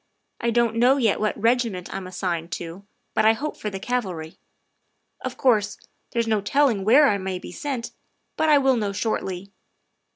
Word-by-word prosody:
I 235 - 0
don't 235 -1 +2
know 250 +4 +5
yet 230 -6 +2
what 215 0 -1
regiment 230 -5 0
I'm 190 -1 -5
assigned 175 -2 -3
to, 175 +4 -7 0.3
but - - +2
I 220 +1 +6
hope 295 +7 -4
for 210 - -4
the 195 -1 -6
cavalry. 190 -9 -3 0.8
Of - - -4
course, 215 -6 +2 0.3
there's 235 -1 0
no 215 -2 +1
telling 235 -1 +2
where 265 +8 +6
I 200 -6 +1
may 190 -1 -3
be - - -9
sent, 275 -7 -4 0.4
but 315 - +1
I 295 - +7
will 265 -2 +3
know 205 -3 -1
shortly. 195 -2 -3
220 Hz, 175 wpm, -24 LUFS, 190-245 Hz, 0.8 s, I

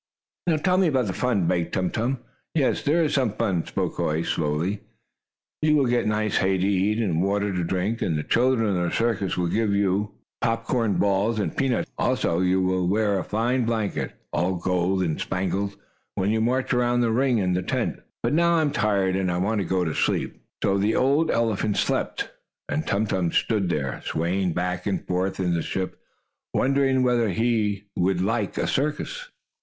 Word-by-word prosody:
"Now 165 -2 +3
tell 180 +4 +2
me 190 - +4
about 130 -5 +2
the 95 - -2
fun," 110 -7 +1
begged 85 0 0
Tum 95 -1 0
Tum. 120 +3 -1 0.3
"Yes, 140 -5 +2
there 160 +3 +2
is 150 - 0
some 130 -7 +1
fun," 95 -8 -1
spoke - - -2
Hoy, 80 +2 0
slowly. 85 +7 -1 0.8
"You 155 0 +4
will 140 -3 +3
get 120 -2 +1
nice 105 -1 0
hay 95 0 +2
to 95 +1 +1
eat, 100 +2 +1
and 90 -8 0
water 100 +1 0
to 90 -1 -1
drink, 95 +6 -1
and 80 -4 0
the 75 - -2
children 120 0 +2
in 90 - 0
the 85 - 0
circus 115 -5 0
will 90 - +1
give 105 +3 +1
you 100 +1 +1 0.3
popcorn 115 -1 0
balls 100 +3 +1
and 95 -6 -2
peanuts 130 -3 +1
to - - -35
eat. - - -20
Also, 85 - +1
you 95 0 +2
will 90 -1 +1
wear 100 0 +2
a - - -3
fine 120 +4 0
blanket, 110 -3 -2 0.2
all 90 +2 +1
gold 90 +1 0
and 80 -3 -2
spangles, 95 +2 -2 0.4
when 95 +2 +1
you 110 0 +1
march 130 +4 +1
around 120 0 +2
the 115 -2 +2
ring 125 +1 +2
in 90 -3 +1
the 90 - 0
tent. - - -2 0.2
But - - +1
now 170 +2 +4
I 165 - +3
am 150 -2 +1
tired, 100 -5 +1
and 95 -2 0
I 90 - -1
want 100 +3 0
to - - -2
go 95 -1 +1
to 80 - -1
sleep." - - 0 0.3
So 100 0 +2
the 105 +3 +1
old 145 +5 +3
elephant 110 -3 0
slept, - - -1 0.4
and 155 - -2
Tum 100 +2 +1
Tum 90 -5 0
stood 105 -6 +1
there, 70 -6 -2
swaying 90 +2 -1
backward 90 +3 -1
and - - -6
forward 90 +2 -1
in 90 -2 +1
the 85 - 0
ship, 95 +2 -4 0.5
wondering 135 -1 +2
whether 120 -3 +2
he 105 -1 0
would 90 0 +1
like 105 +2 -1
a - - 0
circus. - - -2
100 Hz, 200 wpm, -24 LUFS, 90-120 Hz, 0.8 s, me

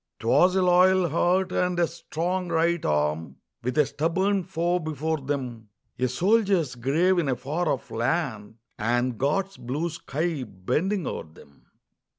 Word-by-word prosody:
'Twas 145 +11 +4
a 190 - +3
loyal 180 0 +4
heart, 180 +4 +1
and 180 -1 0
a 170 - +4
strong 175 +2 -3
right 170 0 +1
arm, 75 -1 0 0.3
With 125 +3 -2
a 150 - +5
stubborn 185 +7 0
foe 175 +2 0
before 155 0 -2
them; 130 -6 -4 0.3
A 130 - +2
soldier's 190 - +2
grave 160 +10 +2
in 155 -5 0
a 130 - +1
far 150 +7 -2
off 130 - -3
land, 120 -4 -2 0.2
And 120 +2 0
God's 190 +8 0
blue 150 +8 -3
sky 155 +1 -3
bending 140 - -2
o'er - - -4
them. 75 -2 -19
155 Hz, 150 wpm, -26 LUFS, 125-180 Hz, 0.3 s, a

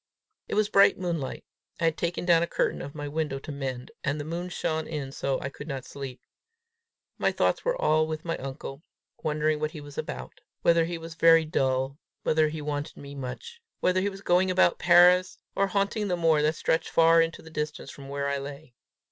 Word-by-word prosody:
It - - -3
was 215 0 +3
bright 200 -1 +5
moonlight. 170 -7 -3 0.3
I - - -3
had 165 -1 +3
taken 170 +1 -2
down 170 -2 +5
a 170 - +1
curtain - - 0
of 140 +2 -8
my 145 -1 -5
window 150 -2 -2
to 140 - -8
mend, 130 -3 -5
and 145 +2 -1
the 145 - -4
moon 170 +3 -4
shone 160 -2 -2
in 145 -4 -4
so 135 -1 -1
that - - -6
I - - -2
could 140 +2 -10
not 135 -4 -5
sleep. 135 -3 -7 1.0
My - - +2
thoughts - - +1
were - - 0
all 155 +1 +3
with 155 0 -5
my 165 - -1
uncle 135 +1 -7 0.4
wondering 155 -1 0
what 155 0 -1
he 155 -1 -9
was 145 -1 -8
about; 65 0 -6 0.2
whether 170 -1 +4
he 170 0 -4
was 165 0 -8
very 165 0 +6
dull; 135 -2 0 0.2
whether 155 0 +3
he 155 -1 -6
wanted 145 0 -4
me 140 0 -9
much; 140 - -7 0.2
whether 185 0 +2
he 200 - +1
was 195 0 -10
going 185 0 +3
about 185 -1 +3
Paris, 180 +1 +6 0.2
or 195 - +2
haunting 200 +2 0
the 180 -2 0
moor 165 -3 +3
that 155 +2 +2
stretched 160 - 0
far 165 0 +5
into 165 +1 -2
the 160 - -12
distance 150 -1 -4
from 135 -1 -11
where 140 0 -2
I 140 0 -1
lay. 140 0 -9
155 Hz, 215 wpm, -27 LUFS, 140-170 Hz, 1.0 s, very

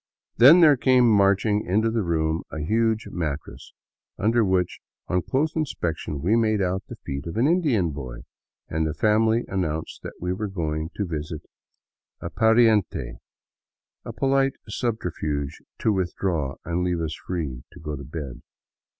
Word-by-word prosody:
Then 145 +9 +9
there 150 -4 +7
came 125 -1 +4
marching 105 0 +3
into 110 +5 +1
the 115 0 0
room 80 -2 0
a - - -6
huge 110 +7 0
mattress 75 -4 -5 0.5
under 115 +2 +2
which, 95 -3 0 0.3
on 90 - +1
close 150 - -1
inspection, 85 - -3
we 100 +6 +3
made 110 -2 +2
out 95 0 0
the - - -8
feet 70 +3 -4
of 85 - -5
an 120 - +3
Indian 145 - +2
boy, 65 -4 -7 0.5
and 80 0 -1
the 75 - -3
family 110 +5 +3
an 95 -1 -1
nounced 80 -2 -4
that - - -7
they 90 +1 -2
were 105 +3 -3
going 80 -4 -3
to 100 - -1
visit 80 -2 -5 0.8
a - - -6
pariente 110 - +2 0.4
— - - -69
a - - -6
polite 135 0 +1
subterfuge 80 - -3 0.2
to 110 - +1
withdraw 90 -6 -1
and 85 +1 -1
leave 90 -1 0
us 80 -1 -2
free 75 -10 -4
to - - -13
go 75 -1 -5
to 70 - -8
bed. 75 -3 -7
95 Hz, 160 wpm, -24 LUFS, 80-110 Hz, 0.8 s, Then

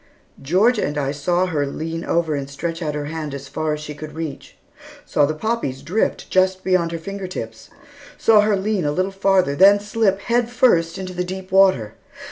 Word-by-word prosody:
Georgia 200 - +2
and 145 +1 -2
I 140 -1 -1
saw 175 +5 0
her 150 -6 -1
lean 165 +3 -4
over 165 -2 0
and 140 -1 -4
stretch 165 +4 -4
out 150 -2 -2
her 145 -1 -3
hand 155 -2 -5
as 140 0 -8
far 155 +2 -2
as 150 - -5
she 150 0 -7
could 150 +1 -9
reach; 160 -4 -7 0.5
saw 145 - +2
the 155 - -2
poppies 155 - -3
drift 185 +9 -1
just 185 0 +2
beyond 180 -3 +1
her 165 - -3
finger 195 +3 -6
tips; 115 -10 -7 0.5
saw 220 -2 +5
her 210 0 +2
lean 200 -1 -1
a 145 - 0
little 185 +5 -1
farther, 195 -6 +2
then 200 +5 +6
slip, 205 -1 0
head 240 +1 0
first, 185 -9 +2
into 185 -1 -6
the 180 0 -2
deep 185 +1 -7
water. 190 - +4
170 Hz, 200 wpm, -21 LUFS, 150-195 Hz, 0.5 s, then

